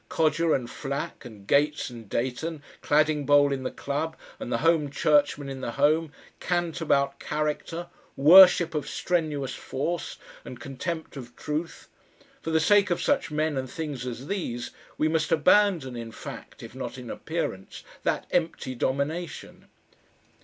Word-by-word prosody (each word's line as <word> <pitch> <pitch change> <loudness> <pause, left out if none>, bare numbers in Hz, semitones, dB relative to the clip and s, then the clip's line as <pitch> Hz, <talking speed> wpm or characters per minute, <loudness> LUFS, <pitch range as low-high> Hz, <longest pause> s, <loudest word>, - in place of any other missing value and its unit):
Codger 160 +1 +2
and 125 -3 -3
Flack, 140 +1 -5
and 105 -5 -11
Gates 145 +2 +2
and 115 -4 -11
Dayton, 145 +6 -3 0.2
Cladingbowl 145 -1 +3
in 135 -1 -2
the 130 - -2
club, 150 +3 -3 0.2
and 120 - -6
the 115 - +2
HOME 160 0 +2
CHURCHMAN 145 0 +2
in 135 -1 -6
the - - -4
home, 155 +2 +2 0.3
cant 175 -2 -1
about 140 -3 +1
"character," 155 +3 -3 0.3
worship 170 +2 +8
of 150 -2 -3
strenuous 155 -6 -1
force 165 +6 -4 0.3
and 125 - -9
contempt 160 +3 -5
of 120 -2 -9
truth; 155 +2 -4 0.5
for - - -4
the 160 0 +3
sake 200 +4 +4
of 175 - 0
such 285 - +1
men 155 0 0
and 130 -1 -3
things 145 -4 -5
as 125 +2 -6
these, 145 -10 -3 0.3
we 155 - +2
must 160 0 0
abandon 165 -4 +3
in 115 -1 -6
fact, - - -10
if 115 - -10
not 130 -1 -6
in 125 -2 -7
appearance, 160 - -4 0.2
that - - -1
empty 165 -6 -1
domination. 140 +7 -3
150 Hz, 150 wpm, -26 LUFS, 130-165 Hz, 0.5 s, worship